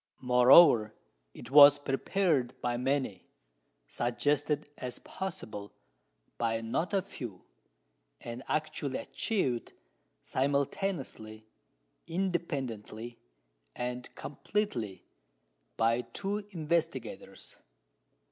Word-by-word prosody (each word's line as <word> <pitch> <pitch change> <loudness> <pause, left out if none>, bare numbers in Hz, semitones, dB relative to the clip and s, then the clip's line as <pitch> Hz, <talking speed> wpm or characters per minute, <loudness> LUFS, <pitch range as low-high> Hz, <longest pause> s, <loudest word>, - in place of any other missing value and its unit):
Moreover, 125 -2 +7 0.4
it 115 - -11
was 145 0 +10
prepared 145 -1 0
by 120 -1 -1
many, 130 -6 -1 0.6
suggested 145 - 0
as 125 -1 -5
possible 110 - -6 0.7
by 115 -1 +1
not 115 +10 -1
a 195 -2 +1
few, 120 - -8 0.8
and 120 +1 -7
actually 150 -3 -1
achieved, 130 - -2 0.5
simultaneously, 135 - -2 0.6
independently, 135 - -3 0.6
and 125 0 -4
completely, 135 - -3 0.7
by 115 +2 +3
two 200 - -4
investigators. 170 -2 -3
130 Hz, 75 wpm, -31 LUFS, 120-165 Hz, 0.8 s, was